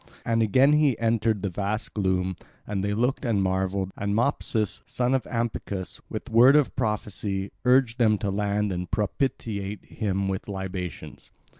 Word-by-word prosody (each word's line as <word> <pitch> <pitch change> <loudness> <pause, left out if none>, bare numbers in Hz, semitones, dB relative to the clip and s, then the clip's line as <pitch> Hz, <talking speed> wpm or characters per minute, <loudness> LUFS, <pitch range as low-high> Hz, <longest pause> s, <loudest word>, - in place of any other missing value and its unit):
And 115 0 +2
again 130 +7 +4
he 150 -6 +3
entered 115 -2 +1
the 100 - -1
vast 105 +4 -3
gloom; 95 -2 0 0.3
and 100 -2 -2
they 105 0 0
looked 125 +6 0
and 110 -6 +1
marvelled; 95 0 -1
and 100 0 -1
Mopsus, 115 -3 0
son 125 +1 0
of 130 - +1
Ampycus, 110 -5 -3
with - - -6
word 125 +5 +7
of 150 -3 +3
prophecy 100 -2 -2
urged 125 -1 +4
them 110 -3 +4
to 100 -1 -2
land 105 +1 0
and 90 -1 -4
propitiate 105 -2 -2
him 100 -3 -2
with 95 -1 -3
libations. 95 -4 -6
105 Hz, 155 wpm, -26 LUFS, 95-115 Hz, 0.3 s, word